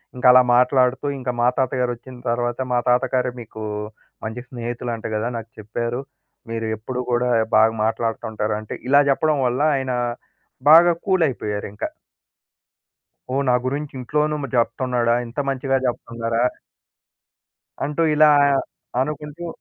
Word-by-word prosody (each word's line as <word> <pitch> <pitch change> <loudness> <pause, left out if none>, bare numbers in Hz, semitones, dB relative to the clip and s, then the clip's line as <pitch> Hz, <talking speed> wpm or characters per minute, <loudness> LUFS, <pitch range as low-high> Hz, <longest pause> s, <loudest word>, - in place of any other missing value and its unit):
ఇంక 125 - -5
అలా 125 0 +8
మాట్లాడుతూ 125 +2 +3
ఇంక 125 -1 -4
మా 120 - +4
తాతగారొచ్చిన 125 -1 -2
తర్వాత 120 0 -1
మా 120 - +3
తాతగారే 125 0 +2
మీకూ 110 -1 -9 0.6
మంచి 110 +3 -5
స్నేహితులంట 120 -1 -5
గదా! 110 +2 -1
నాకు 115 0 -8
చెప్పారు. 115 +3 -3 0.5
మీరెప్పుడూ 115 +2 -3
గూడా 125 +1 +1 0.3
బాగా 110 +1 +5
మాట్లాడతా 115 0 -1
ఉంటారంటే, 105 0 -3 0.2
ఇలా 140 +1 +7
జెప్పడం 150 +2 +2
వల్ల 125 +3 -1
ఆయన 130 -1 -2 0.8
బాగా 170 +2 +8
కూలైపోయారింకా. 125 - -1 1.5
ఓహ్! 140 - +2
నా - - +4
గురించి 140 +3 -2
ఇంట్లోనూ 150 +4 0 0.2
జెప్తన్నాడా? 120 0 +1
ఇంత 115 +4 -6
మంచిగా 135 0 0
జెప్తున్నారా? 115 -1 -2 1.4
అంటూ 150 +3 0
ఇలా 155 0 +6 0.7
అనుకుంటూ 150 +4 -4
125 Hz, 115 wpm, -22 LUFS, 115-135 Hz, 1.5 s, అలా